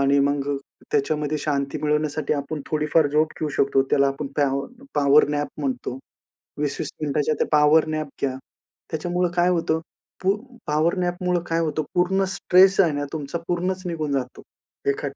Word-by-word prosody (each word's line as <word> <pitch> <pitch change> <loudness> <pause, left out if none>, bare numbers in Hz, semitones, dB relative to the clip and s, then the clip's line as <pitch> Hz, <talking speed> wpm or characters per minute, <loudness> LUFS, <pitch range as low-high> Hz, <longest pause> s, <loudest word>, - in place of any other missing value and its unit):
आणि 140 +1 +4
मग 140 0 0 0.4
त्याच्यामध्ये 150 +1 0
शांती 140 -2 -1
मिळवण्यासाठी 150 0 0
आपण 145 +1 -4
थोडीफार 150 0 +2
झोप 155 +2 +1
घेऊ 155 - 0
शकतो, 135 -1 +3
त्याला 140 -1 +4
आपण 135 +1 -4
पॅवर 140 -1 +1 0.3
पॉवर 145 0 +5
नॅप 145 -1 -1
म्हणतो. 130 -2 -3 0.6
20-20 145 -1 -2
मिनिटांच्या 150 0 0
त्या - - +1
पॉवर 150 +1 +5
नॅप 155 -1 -2
घ्या. 130 -2 0 0.5
त्याच्यामुळं 175 +2 -1
काय 175 +1 +4
होतं? 165 -2 +1 0.4
पू 195 +2 +3 0.3
पॉवर 155 +4 +1
नॅपमुळं 180 0 0
काय 165 0 +1
होतं, 155 -1 0
पूर्ण 190 +2 +2
स्ट्रेस 190 +2 +5
आहे 165 -5 +4
ना, 145 0 -2
तुमचा, 155 +1 -4
पूर्णच 180 +1 -1
निघून 155 -4 -2
जातो, 130 -2 -3 0.5
एका 140 0 -2
150 Hz, 155 wpm, -23 LUFS, 140-170 Hz, 0.6 s, पॉवर